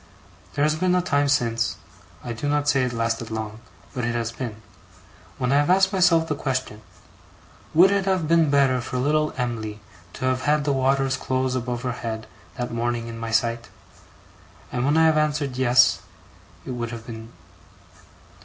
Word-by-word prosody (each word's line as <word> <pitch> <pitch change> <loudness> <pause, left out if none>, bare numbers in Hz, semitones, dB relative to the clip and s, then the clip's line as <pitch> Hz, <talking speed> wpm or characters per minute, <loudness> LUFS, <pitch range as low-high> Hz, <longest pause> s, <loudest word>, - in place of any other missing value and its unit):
There 145 - +1
has 155 +1 +3
been 180 +3 +1
a 180 - +3
time 145 -4 +1
since 115 -5 +1 0.5
I 120 - -4
do 145 +6 -3
not 145 0 0
say 135 -2 +3
it 125 - -1
lasted 115 -1 -2
long, 110 -1 -5 0.3
but 125 -3 -3
it 120 0 -1
has 115 -1 -2
been 115 -3 -6 0.8
when 125 0 -1
I 140 - +4
have 145 +2 +2
asked 190 +2 +4
myself 175 -3 +4
the 155 - 0
question, 130 -6 -3 0.9
would 185 +4 +7
it 200 -1 +1
have 185 -5 +1
been 165 -1 +4
better 135 -3 +3
for 125 - -4
little 150 +4 +1
Em'ly 110 -4 -3 0.3
to - - -5
have 130 0 +1
had 150 0 +2
the 140 -1 +1
waters 135 0 +1
close 130 0 -1
above 125 -1 -3
her 125 - -1
head 115 -2 -5 0.3
that 125 -1 -3
morning 120 0 -1
in 115 0 -7
my 115 0 -4
sight; 115 +1 0 1.0
and 125 0 -1
when 145 +3 +2
I 160 - +5
have 160 -1 +4
answered 150 -3 -1
Yes, 125 -1 +4 0.6
it - - -5
would 120 -1 -3
have 115 -1 -8
been. 115 0 -9
130 Hz, 180 wpm, -24 LUFS, 115-150 Hz, 1.0 s, would